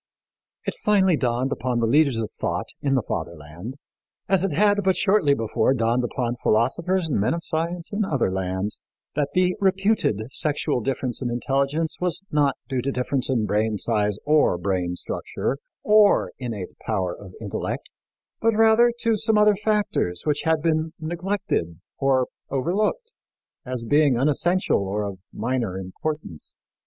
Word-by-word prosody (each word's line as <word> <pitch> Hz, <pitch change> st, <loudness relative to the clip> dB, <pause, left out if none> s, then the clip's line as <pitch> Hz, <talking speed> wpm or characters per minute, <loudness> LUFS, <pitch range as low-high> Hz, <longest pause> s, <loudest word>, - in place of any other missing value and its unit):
It -, -, -1 dB
finally 190 Hz, -4 st, +4 dB
dawned 125 Hz, 0 st, 0 dB
upon 125 Hz, -1 st, -1 dB
the 115 Hz, -, +2 dB
leaders 140 Hz, +1 st, +3 dB
of 110 Hz, -2 st, -3 dB
thought -, -, -3 dB
in 135 Hz, -1 st, +1 dB
the 130 Hz, -, +1 dB
Fatherland, 85 Hz, -, -6 dB, 0.5 s
as 190 Hz, -1 st, +2 dB
it 195 Hz, -, 0 dB
had 205 Hz, 0 st, +3 dB
but 190 Hz, 0 st, +3 dB
shortly 190 Hz, -9 st, +3 dB
before 115 Hz, +2 st, +1 dB
dawned 120 Hz, +1 st, +1 dB
upon 120 Hz, 0 st, -2 dB
philosophers 170 Hz, -, +1 dB
and 145 Hz, -, 0 dB
men 105 Hz, +11 st, +1 dB
of 170 Hz, -, -5 dB
science 170 Hz, +1 st, -3 dB
in 210 Hz, +1 st, +1 dB
other 135 Hz, -, 0 dB
lands, 95 Hz, +2 st, -2 dB, 0.3 s
that 145 Hz, 0 st, 0 dB
the 180 Hz, 0 st, +3 dB
reputed 195 Hz, -, +2 dB
sexual 150 Hz, -3 st, 0 dB
difference 125 Hz, 0 st, -2 dB
in 125 Hz, -, -1 dB
intelligence 140 Hz, +6 st, 0 dB
was 180 Hz, +1 st, -1 dB
not 145 Hz, -3 st, +2 dB
due 130 Hz, -2 st, -1 dB
to 140 Hz, +3 st, -1 dB
difference 130 Hz, +1 st, -1 dB
in 120 Hz, -5 st, +1 dB
brain 105 Hz, +1 st, +1 dB
size 105 Hz, -2 st, 0 dB
or 150 Hz, -11 st, +4 dB
brain 90 Hz, -1 st, -1 dB
structure, 135 Hz, +8 st, -3 dB, 0.2 s
or 210 Hz, -1 st, +5 dB
innate 110 Hz, -8 st, -6 dB
power 95 Hz, -5 st, -1 dB
of 95 Hz, -2 st, -12 dB
intellect, 105 Hz, -3 st, -4 dB, 0.5 s
but 225 Hz, -1 st, +3 dB
rather 225 Hz, +2 st, +5 dB
to 230 Hz, -1 st, +2 dB
some 215 Hz, +1 st, +1 dB
other 210 Hz, 0 st, +5 dB
factors 210 Hz, -, 0 dB
which 150 Hz, -1 st, +1 dB
had 160 Hz, -1 st, +2 dB
been 160 Hz, -1 st, +1 dB
neglected, 175 Hz, -, -2 dB, 0.2 s
or 135 Hz, -2 st, +3 dB, 0.2 s
overlooked, 210 Hz, -, -1 dB, 0.5 s
as 125 Hz, -2 st, -4 dB
being 145 Hz, 0 st, +3 dB
unessential 160 Hz, +7 st, +2 dB
or 100 Hz, +2 st, -2 dB
of 100 Hz, -2 st, -5 dB
minor 115 Hz, -4 st, -2 dB
importance. 95 Hz, -, -5 dB
135 Hz, 155 wpm, -24 LUFS, 110-180 Hz, 0.5 s, or